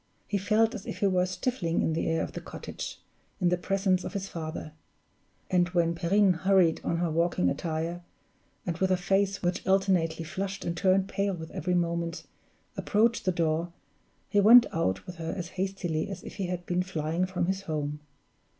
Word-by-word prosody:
He 200 Hz, -, -1 dB
felt 215 Hz, +4 st, +2 dB
as 210 Hz, -5 st, -7 dB
if -, -, -4 dB
he -, -, 0 dB
were 185 Hz, -2 st, +3 dB
stifling 185 Hz, -3 st, -1 dB
in 160 Hz, -, +1 dB
the 160 Hz, -, -1 dB
air 165 Hz, 0 st, +1 dB
of -, -, -5 dB
the -, -, -6 dB
cottage, -, -, -7 dB, 0.4 s
in 180 Hz, -3 st, +3 dB
the 180 Hz, -, +3 dB
presence 190 Hz, 0 st, +1 dB
of -, -, -5 dB
his 195 Hz, -1 st, -3 dB
father; 160 Hz, -2 st, -6 dB, 0.8 s
and 175 Hz, -1 st, +3 dB
when 170 Hz, -1 st, +3 dB
Perrine 190 Hz, +3 st, +3 dB
hurried 185 Hz, -2 st, +3 dB
on 170 Hz, -, 0 dB
her 170 Hz, -1 st, 0 dB
walking 165 Hz, -, +2 dB
attire, 165 Hz, +1 st, -3 dB, 0.6 s
and 175 Hz, -, -1 dB
with 190 Hz, -, +2 dB
a 185 Hz, -, +3 dB
face 195 Hz, +2 st, +1 dB
which 175 Hz, 0 st, 0 dB
alternately 185 Hz, -4 st, +2 dB
flushed 195 Hz, +3 st, -4 dB
and 170 Hz, -, -1 dB
turned 190 Hz, +1 st, +3 dB
pale 200 Hz, -1 st, -1 dB
with 160 Hz, -1 st, -8 dB
every 180 Hz, +3 st, -1 dB
moment, 170 Hz, -1 st, -1 dB, 0.5 s
approached 230 Hz, +3 st, +1 dB
the 185 Hz, -, +3 dB
door, 170 Hz, 0 st, 0 dB, 0.5 s
he 205 Hz, -, +2 dB
went 230 Hz, +4 st, +9 dB
out 95 Hz, -, 0 dB
with 180 Hz, -1 st, -8 dB
her 165 Hz, 0 st, -4 dB
as 175 Hz, -2 st, -4 dB
hastily 185 Hz, -4 st, -2 dB
as 190 Hz, -2 st, -7 dB
if -, -, -9 dB
he 195 Hz, -3 st, -2 dB
had 175 Hz, -1 st, -4 dB
been 180 Hz, +1 st, 0 dB
flying 170 Hz, -1 st, -1 dB
from 185 Hz, -2 st, -1 dB
his 190 Hz, +2 st, -1 dB
home. 150 Hz, -4 st, -3 dB
180 Hz, 190 wpm, -28 LUFS, 165-195 Hz, 0.8 s, went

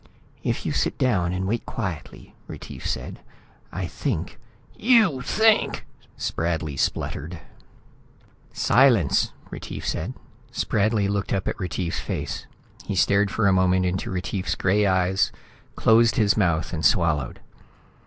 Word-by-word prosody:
"If -, -, -2 dB
you'll -, -, -1 dB
sit -, -, 0 dB
down 95 Hz, -9 st, +1 dB
and 95 Hz, +1 st, -2 dB
wait 115 Hz, +3 st, -1 dB
quietly," 85 Hz, -11 st, -6 dB
Retief -, -, -8 dB
said, -, -, -4 dB, 0.5 s
"I 90 Hz, +1 st, -3 dB
think 90 Hz, -, -3 dB, 0.2 s
" 120 Hz, -, -29 dB, 0.2 s
"You 200 Hz, -, +5 dB
think!" 220 Hz, -, +2 dB, 0.3 s
Spradley 80 Hz, -3 st, -2 dB
spluttered. 80 Hz, +5 st, -2 dB, 1.1 s
"Silence!" 115 Hz, -, +3 dB, 0.2 s
Retief -, -, -6 dB
said. -, -, -3 dB, 0.4 s
Spradley 105 Hz, 0 st, +1 dB
looked 100 Hz, 0 st, -1 dB
up 95 Hz, -2 st, -1 dB
at -, -, -3 dB
Retief's 90 Hz, -2 st, -3 dB
face. 70 Hz, -2 st, -4 dB, 0.4 s
He 100 Hz, -, -4 dB
stared 100 Hz, +2 st, +3 dB
for 110 Hz, +2 st, 0 dB
a 95 Hz, -, +4 dB
moment 95 Hz, 0 st, +3 dB
into 90 Hz, +1 st, -2 dB
Retief's 95 Hz, +1 st, -2 dB
gray 100 Hz, +2 st, +2 dB
eyes, 95 Hz, 0 st, +2 dB, 0.4 s
closed 115 Hz, +1 st, +4 dB
his 105 Hz, -3 st, +3 dB
mouth 85 Hz, -7 st, +1 dB
and 80 Hz, -1 st, -3 dB
swallowed. 80 Hz, -, +2 dB
95 Hz, 130 wpm, -24 LUFS, 85-110 Hz, 1.1 s, You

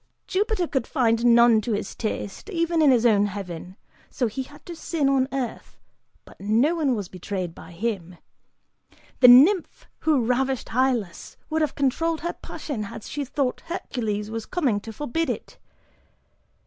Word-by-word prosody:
"Jupiter 400 Hz, -1 st, 0 dB
could 265 Hz, -7 st, -2 dB
find 230 Hz, -4 st, +1 dB
none 235 Hz, -1 st, +6 dB
to 225 Hz, +1 st, -2 dB
his 205 Hz, -, -3 dB
taste, 215 Hz, -, -5 dB
even 335 Hz, -3 st, +1 dB
in 300 Hz, -, +6 dB
his 245 Hz, -3 st, +4 dB
own 205 Hz, -3 st, +4 dB
heaven, 185 Hz, -2 st, -7 dB, 0.3 s
so 255 Hz, -, -1 dB
he 230 Hz, +4 st, -3 dB
had 290 Hz, +3 st, -12 dB
to 345 Hz, -, -7 dB
sin 320 Hz, -3 st, -1 dB
on 270 Hz, -1 st, +2 dB
earth, 260 Hz, -3 st, -5 dB, 0.5 s
but -, -, -16 dB
no 225 Hz, +10 st, +3 dB
one 290 Hz, -7 st, +1 dB
was 205 Hz, -4 st, -4 dB
betrayed 185 Hz, -1 st, -5 dB
by -, -, -12 dB
him! 180 Hz, -2 st, -4 dB, 1.0 s
The 255 Hz, -, +8 dB
nymph 300 Hz, +10 st, +6 dB
who 295 Hz, -7 st, +2 dB
ravished 260 Hz, +1 st, 0 dB
Hylas 240 Hz, -6 st, -1 dB, 0.2 s
would 315 Hz, 0 st, +1 dB
have 305 Hz, -, 0 dB
controlled 315 Hz, +4 st, 0 dB
her 345 Hz, +2 st, -2 dB
passion 275 Hz, -8 st, -6 dB
had 200 Hz, -, -8 dB
she 290 Hz, -, -4 dB
thought 270 Hz, -1 st, -2 dB
Hercules 220 Hz, -, -3 dB
was 225 Hz, -1 st, -5 dB
coming 265 Hz, -, 0 dB
to 225 Hz, +2 st, -9 dB
forbid 295 Hz, +7 st, -2 dB
it. -, -, -5 dB
250 Hz, 160 wpm, -24 LUFS, 215-295 Hz, 1.0 s, The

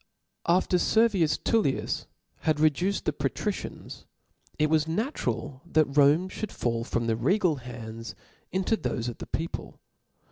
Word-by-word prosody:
After 180 Hz, +1 st, +3 dB
Servius 200 Hz, -7 st, +3 dB
Tpllius 215 Hz, -13 st, 0 dB, 0.3 s
had 155 Hz, -2 st, +1 dB
reduced 165 Hz, +6 st, +2 dB
the 155 Hz, -, +1 dB
Patricians, 145 Hz, +9 st, -4 dB, 0.5 s
It 155 Hz, -, +3 dB
was 155 Hz, 0 st, +2 dB
natural 155 Hz, -, -2 dB
that 155 Hz, -5 st, +1 dB
Rome 150 Hz, +5 st, +5 dB
fiiould 210 Hz, +2 st, -5 dB
fall 115 Hz, -7 st, -1 dB
from 120 Hz, 0 st, -1 dB
the 115 Hz, -1 st, +1 dB
regal 160 Hz, -, +2 dB
hands 115 Hz, -2 st, -8 dB, 0.4 s
into 190 Hz, +4 st, +1 dB
thofe 120 Hz, -, -2 dB
of 120 Hz, -, -8 dB
the -, -, -7 dB
people. 165 Hz, +1 st, -4 dB
155 Hz, 135 wpm, -28 LUFS, 125-185 Hz, 0.5 s, Rome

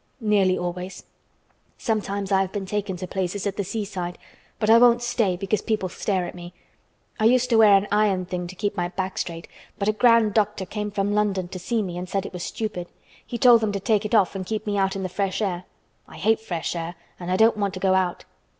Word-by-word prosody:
"Nearly 205 Hz, -5 st, +2 dB
always. 180 Hz, +1 st, -5 dB, 0.7 s
Sometimes 200 Hz, -3 st, -2 dB
I 190 Hz, -1 st, +4 dB
have 190 Hz, -1 st, -2 dB
been 200 Hz, -1 st, -4 dB
taken 200 Hz, -1 st, -3 dB
to 185 Hz, -, -5 dB
places 190 Hz, +2 st, -3 dB
at 200 Hz, -, -1 dB
the 200 Hz, -, -1 dB
seaside, 190 Hz, -3 st, -4 dB, 0.4 s
but 215 Hz, -, -1 dB
I 225 Hz, +1 st, +7 dB
won't 240 Hz, 0 st, +5 dB
stay 225 Hz, -7 st, +1 dB
because 195 Hz, +3 st, -1 dB
people 215 Hz, -5 st, -1 dB
stare 185 Hz, 0 st, -1 dB
at -, -, -7 dB
me. 175 Hz, 0 st, -10 dB, 0.6 s
I 215 Hz, -, +2 dB
used 250 Hz, +2 st, +4 dB
to 230 Hz, -, +5 dB
wear 215 Hz, -2 st, +7 dB
an 195 Hz, +1 st, +2 dB
iron 205 Hz, -3 st, +2 dB
thing 180 Hz, -1 st, -4 dB
to 185 Hz, -, -10 dB
keep 205 Hz, +1 st, -2 dB
my 175 Hz, -2 st, -1 dB
back 190 Hz, +1 st, -4 dB
straight, 165 Hz, -1 st, -5 dB, 0.3 s
but 200 Hz, -, -2 dB
a -, -, +5 dB
grand 230 Hz, -1 st, +4 dB
doctor 210 Hz, -2 st, +1 dB
came 210 Hz, +2 st, -4 dB
from 205 Hz, 0 st, -1 dB
London 200 Hz, -4 st, 0 dB
to 185 Hz, -, -6 dB
see 220 Hz, +5 st, -1 dB
me 175 Hz, -2 st, -5 dB
and 180 Hz, 0 st, -6 dB
said 195 Hz, 0 st, -1 dB
it -, -, -7 dB
was 180 Hz, -, -6 dB
stupid. 190 Hz, -3 st, -4 dB, 0.4 s
He 240 Hz, -, -5 dB
told 235 Hz, -1 st, +6 dB
them 215 Hz, -2 st, 0 dB
to 200 Hz, -, -1 dB
take 215 Hz, +1 st, +1 dB
it 210 Hz, +2 st, 0 dB
off 200 Hz, -5 st, +4 dB
and 195 Hz, -1 st, -4 dB
keep 215 Hz, +2 st, -4 dB
me 205 Hz, -1 st, -1 dB
out 195 Hz, -1 st, +1 dB
in 195 Hz, -, -3 dB
the -, -, -1 dB
fresh 190 Hz, +1 st, -2 dB
air. 185 Hz, -4 st, -2 dB, 0.4 s
I -, -, -13 dB
hate 220 Hz, +2 st, +2 dB
fresh 175 Hz, -6 st, -4 dB
air 170 Hz, +1 st, -4 dB, 0.2 s
and 175 Hz, 0 st, -6 dB
I 185 Hz, -, +2 dB
don't 220 Hz, +1 st, +4 dB
want 200 Hz, -2 st, -1 dB
to -, -, -5 dB
go 190 Hz, 0 st, +2 dB
out." 185 Hz, -2 st, 0 dB
195 Hz, 240 wpm, -24 LUFS, 185-215 Hz, 0.7 s, I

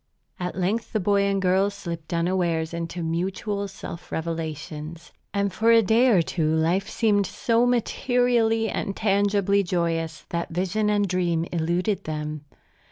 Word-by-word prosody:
At 180 Hz, 0 st, -3 dB
length 195 Hz, +7 st, -1 dB
the 215 Hz, -, +2 dB
boy 200 Hz, +1 st, +2 dB
and 195 Hz, 0 st, +1 dB
girl 190 Hz, +1 st, +3 dB
slipped 170 Hz, -5 st, -7 dB
unawares 170 Hz, -2 st, 0 dB
into 170 Hz, +1 st, -4 dB
mutual 190 Hz, +5 st, -2 dB
self 180 Hz, -3 st, -9 dB
revelations; 160 Hz, 0 st, -5 dB, 0.2 s
and 200 Hz, -2 st, -1 dB
for 225 Hz, +4 st, +3 dB
a 230 Hz, -1 st, +6 dB
day 225 Hz, +6 st, +4 dB
or 195 Hz, -9 st, +4 dB
two 160 Hz, -2 st, 0 dB
life 175 Hz, +6 st, +1 dB
seemed 205 Hz, -4 st, +2 dB
so 235 Hz, +1 st, +1 dB
materially 240 Hz, -2 st, +2 dB
and 195 Hz, -1 st, -3 dB
tangibly 200 Hz, -1 st, +2 dB
joyous 165 Hz, -3 st, -2 dB
that 170 Hz, 0 st, -2 dB
vision 190 Hz, +5 st, 0 dB
and 205 Hz, -1 st, +2 dB
dream 175 Hz, -3 st, 0 dB
eluded 175 Hz, +4 st, -1 dB
them. 150 Hz, -1 st, -4 dB
185 Hz, 145 wpm, -25 LUFS, 165-205 Hz, 0.2 s, a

